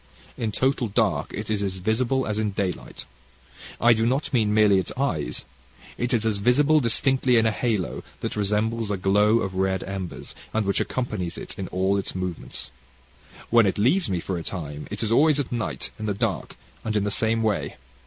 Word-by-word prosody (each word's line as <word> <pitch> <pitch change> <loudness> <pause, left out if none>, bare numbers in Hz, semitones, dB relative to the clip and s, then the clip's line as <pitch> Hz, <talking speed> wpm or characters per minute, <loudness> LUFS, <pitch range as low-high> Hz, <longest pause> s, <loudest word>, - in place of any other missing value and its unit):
"In 110 -2 -2
total 130 +1 +1
dark 100 -8 0
it 105 0 -5
is 100 -3 -1
visible 120 +7 +1
as 105 0 -1
in 110 -1 0
daylight. 95 -3 -3 0.7
I 120 0 +6
do 110 0 0
not 130 +6 0
mean 110 -4 +3
merely 105 -2 +5
its 95 - -4
eyes. 80 - -1 0.5
It 120 +1 -2
is 115 -3 +2
all 110 - +3
visible 145 +6 +4
distinctly 130 0 +3
in 115 - +4
a 110 - +3
halo 105 -5 -1 0.2
that - - -3
resembles 105 +2 0
a 100 - 0
glow 105 +4 +3
of 95 - -3
red 95 0 0
embers, 95 -2 -6 0.2
and 110 -2 +1
which 100 -1 +1
accompanies 105 -9 -3
it - - -7
in 95 - -5
all 95 +2 +1
its 95 - -3
movements. 90 -7 -4 0.8
"When 115 -3 +6
it 95 - 0
leaves 130 - +2
me 90 -2 0
for 90 +1 -3
a - - -6
time, 75 -5 -6
it 105 +2 -4
is 110 - -1
always 150 +4 +4
at 140 - -2
night, 120 -3 -3
in 110 - -3
the 100 - 0
dark, - - -2 0.3
and 110 -1 -2
in 105 - +2
the 105 - -1
same 115 +2 +1
way. 110 -2 -1
105 Hz, 195 wpm, -25 LUFS, 95-120 Hz, 0.8 s, I